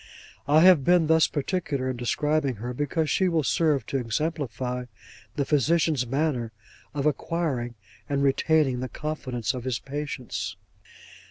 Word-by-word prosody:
I 150 Hz, +2 st, +5 dB
have 180 Hz, -5 st, +7 dB
been 175 Hz, +2 st, +4 dB
thus 160 Hz, 0 st, +4 dB
particular 145 Hz, -3 st, -2 dB
in 130 Hz, -, -2 dB
describing 140 Hz, +3 st, 0 dB
her, 120 Hz, +4 st, -5 dB
because 145 Hz, +4 st, -1 dB
she 185 Hz, +4 st, +2 dB
will 165 Hz, -3 st, +1 dB
serve 145 Hz, -4 st, +1 dB
to 135 Hz, -, -1 dB
exemplify 125 Hz, -1 st, -2 dB, 0.5 s
the 140 Hz, -, 0 dB
physician's 150 Hz, -2 st, +2 dB
manner 135 Hz, -3 st, -1 dB, 0.4 s
of 140 Hz, -1 st, -1 dB
acquiring 145 Hz, -5 st, -1 dB, 0.3 s
and 140 Hz, -1 st, 0 dB
retaining 140 Hz, -1 st, +2 dB
the 130 Hz, 0 st, -4 dB
confidence 130 Hz, -7 st, -3 dB
of 125 Hz, -2 st, -5 dB
his 130 Hz, -2 st, -1 dB
patients. 140 Hz, -2 st, -5 dB
140 Hz, 140 wpm, -26 LUFS, 125-155 Hz, 0.5 s, have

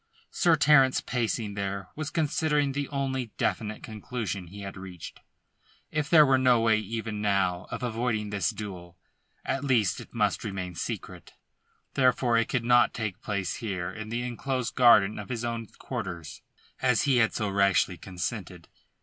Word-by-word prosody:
Sir 170 Hz, -2 st, +4 dB
Terence, 140 Hz, -3 st, +5 dB
pacing 115 Hz, -3 st, -2 dB
there, 100 Hz, -2 st, -4 dB
was 155 Hz, -1 st, -4 dB
considering 150 Hz, -2 st, +1 dB
the 140 Hz, 0 st, -2 dB
only 135 Hz, -3 st, -2 dB
definite 110 Hz, -1 st, -2 dB
conclusion 105 Hz, -4 st, -5 dB
he 100 Hz, +4 st, -10 dB
had 100 Hz, 0 st, -7 dB
reached. 95 Hz, -3 st, -9 dB, 0.7 s
If 150 Hz, -2 st, -1 dB
there 155 Hz, -3 st, +8 dB
were 135 Hz, -1 st, +4 dB
no 125 Hz, -2 st, +5 dB
way 110 Hz, -1 st, +3 dB
even 110 Hz, 0 st, -4 dB
now 95 Hz, -3 st, +1 dB
of -, -, -5 dB
avoiding 115 Hz, -3 st, -1 dB
this 100 Hz, -4 st, 0 dB
duel, 90 Hz, -4 st, -7 dB, 0.5 s
at 135 Hz, -, -1 dB
least 120 Hz, -8 st, +2 dB
it -, -, -13 dB
must -, -, 0 dB
remain 95 Hz, -3 st, -4 dB
secret. 85 Hz, -, -6 dB, 0.6 s
Therefore 125 Hz, -2 st, +3 dB
it 115 Hz, -, -1 dB
could 125 Hz, -4 st, -1 dB
not 120 Hz, 0 st, +4 dB
take 110 Hz, -5 st, -4 dB
place 100 Hz, -4 st, -2 dB
here 95 Hz, -5 st, -3 dB
in 110 Hz, +2 st, -7 dB
the 120 Hz, +2 st, -2 dB
enclosed 125 Hz, +1 st, -3 dB
garden 110 Hz, -5 st, +5 dB
of 100 Hz, -, -8 dB
his 120 Hz, -1 st, -3 dB
own 115 Hz, -1 st, -3 dB
quarters, 85 Hz, -4 st, -6 dB, 0.4 s
as 125 Hz, -3 st, +3 dB
he 140 Hz, -3 st, +3 dB
had 115 Hz, -2 st, +3 dB
so 105 Hz, -, -1 dB
rashly 100 Hz, -2 st, +2 dB
consented. 90 Hz, -3 st, -5 dB
110 Hz, 160 wpm, -28 LUFS, 100-130 Hz, 0.7 s, there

